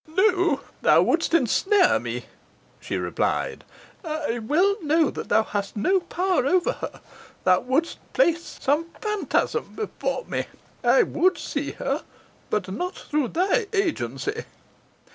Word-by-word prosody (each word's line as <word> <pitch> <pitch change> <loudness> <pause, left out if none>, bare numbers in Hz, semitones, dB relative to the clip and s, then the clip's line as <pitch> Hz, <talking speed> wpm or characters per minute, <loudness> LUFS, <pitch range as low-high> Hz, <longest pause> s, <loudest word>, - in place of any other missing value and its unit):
"No 360 -3 +2 0.2
thou - - +5
would'st 330 0 +2
ensnare 365 - +3
me," - - -5 0.5
she - - -3
replied. - - -1 0.4
"I 305 -7 -2
well 345 - +2
know 315 0 +2
thou 220 - +1
hast 205 -1 -4
no 375 - +3
power 360 -1 0
over 360 +3 +3
her. - - -7 0.4
Thou 185 0 +5
would'st 280 +7 -1
place 340 -9 +1
some 295 +4 +1
phantasm 425 -2 -1
before 475 +3 -3
me. - - -2 0.4
I - - +5
would 370 -1 +2
see 285 0 -3
her, 275 +3 -2 0.5
but 205 -3 -1
not 360 - -3
through 300 -3 -1
thy 390 - +1
agency." 295 - -1
330 Hz, 125 wpm, -24 LUFS, 275-375 Hz, 0.5 s, thou